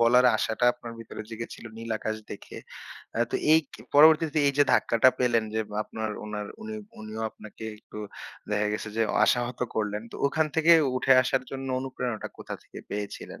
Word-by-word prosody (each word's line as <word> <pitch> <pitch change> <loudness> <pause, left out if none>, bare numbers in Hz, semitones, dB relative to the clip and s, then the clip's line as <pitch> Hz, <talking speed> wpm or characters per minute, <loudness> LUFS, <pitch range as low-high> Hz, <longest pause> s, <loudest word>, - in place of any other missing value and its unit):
বলার 125 +2 +6
আশাটা 110 +2 0
আপনার 120 -1 -9
ভিতরে 115 -1 -8
জেগে 115 +1 -5
ছিল - - -13
নীল 115 0 -7
আকাশ 110 +1 -2
দেখে। - - -9 0.6
অ্যা 115 - +2
তো - - +1 0.2
এই 160 - +7
কে - - -11
পরবর্তীতে 155 +1 +6
এইযে 140 +1 +4
ধাক্কাটা 115 +1 +5
পেলেন 120 -3 +2
যে, 110 - +1 0.2
আপনার 110 0 -4
উনার 105 -1 -4 0.2
উনি 220 0 -5 0.2
উনিও 110 +1 -7
আপনাকে 110 0 -11
একটু 105 - -11 0.5
দেখা 105 0 +1
গেছে 110 +1 -3
যে 115 - +3 0.2
আশাহত 120 0 +1 0.2
করলেন। 105 0 -1
তো - - -12
ওখান 160 +2 +1
থেকে 165 +1 +6 0.2
উঠে 135 +1 +4
আসার 130 0 0
জন্য 135 0 -5
অনুপ্রেরণাটা 125 -4 -4
কোথা - - -6
থেকে - - -12
পেয়েছিলেন? 105 0 -5
115 Hz, 175 wpm, -27 LUFS, 110-135 Hz, 0.6 s, এই